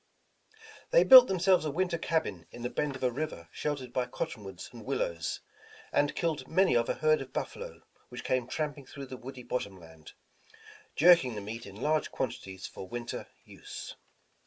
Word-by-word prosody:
They -, -, +6 dB
built 255 Hz, -1 st, +11 dB
themselves 185 Hz, -2 st, +3 dB
a 155 Hz, -, -1 dB
winter 170 Hz, +2 st, 0 dB
cabin 105 Hz, -, -1 dB
in 120 Hz, -, -10 dB
the 125 Hz, -, -2 dB
bend 150 Hz, -2 st, -1 dB
of 130 Hz, -, -8 dB
a 125 Hz, -, +3 dB
river 125 Hz, -, -5 dB
sheltered 135 Hz, -5 st, -3 dB
by 125 Hz, -1 st, 0 dB
cottonwoods 95 Hz, -6 st, -6 dB
and 115 Hz, -2 st, -10 dB
willows, 85 Hz, -, -2 dB, 0.5 s
and 145 Hz, 0 st, +2 dB
killed 155 Hz, -6 st, -1 dB
many 185 Hz, -3 st, +3 dB
of 115 Hz, 0 st, +2 dB
a -, -, +1 dB
herd 155 Hz, -1 st, +3 dB
of 130 Hz, -1 st, -8 dB
buffalo, -, -, -5 dB, 0.3 s
which -, -, -8 dB
came 130 Hz, -2 st, 0 dB
tramping 145 Hz, -1 st, -3 dB
through 140 Hz, -1 st, -8 dB
the 130 Hz, -, -8 dB
woody 130 Hz, 0 st, -9 dB
bottom 100 Hz, -6 st, -3 dB
land, 80 Hz, -2 st, -14 dB, 0.8 s
jerking 165 Hz, -7 st, +6 dB
the -, -, -3 dB
meat 110 Hz, +3 st, -7 dB
in 100 Hz, -, -11 dB
large 150 Hz, +7 st, 0 dB
quantities 95 Hz, -7 st, -4 dB
for 95 Hz, -, -8 dB
winter 120 Hz, +4 st, -5 dB, 0.2 s
use. -, -, -9 dB
130 Hz, 175 wpm, -30 LUFS, 115-155 Hz, 0.8 s, built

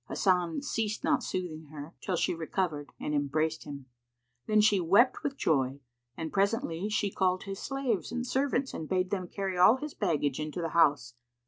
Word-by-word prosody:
Hasan 180 Hz, -, +1 dB
ceased 215 Hz, -5 st, -2 dB
not -, -, +2 dB
soothing 165 Hz, -4 st, -4 dB
her, 150 Hz, +2 st, -9 dB
till 185 Hz, -, -1 dB
she -, -, +1 dB
recovered 160 Hz, -2 st, -2 dB
and 150 Hz, -, -3 dB
embraced 155 Hz, +3 st, 0 dB
him; 140 Hz, -3 st, -8 dB, 0.6 s
then 215 Hz, 0 st, +4 dB
she 210 Hz, -2 st, +5 dB
wept 200 Hz, +9 st, +4 dB
with 280 Hz, -1 st, -3 dB
joy, 135 Hz, -3 st, +1 dB, 0.4 s
and 160 Hz, -1 st, -5 dB
presently 200 Hz, -2 st, 0 dB
she 210 Hz, -2 st, 0 dB
called 185 Hz, -1 st, +1 dB
his 195 Hz, -1 st, -6 dB
slaves 270 Hz, -7 st, -2 dB
and 245 Hz, 0 st, -2 dB
servants 265 Hz, +1 st, 0 dB
and 155 Hz, -, -6 dB
bade 185 Hz, -1 st, 0 dB
them 185 Hz, -3 st, -2 dB
carry 190 Hz, -1 st, -3 dB
all 200 Hz, +6 st, +7 dB
his 295 Hz, +2 st, -6 dB
baggage 150 Hz, -8 st, 0 dB
into 155 Hz, +2 st, -4 dB
the 165 Hz, -1 st, -2 dB
house. 145 Hz, -7 st, +3 dB
180 Hz, 180 wpm, -30 LUFS, 155-210 Hz, 0.6 s, all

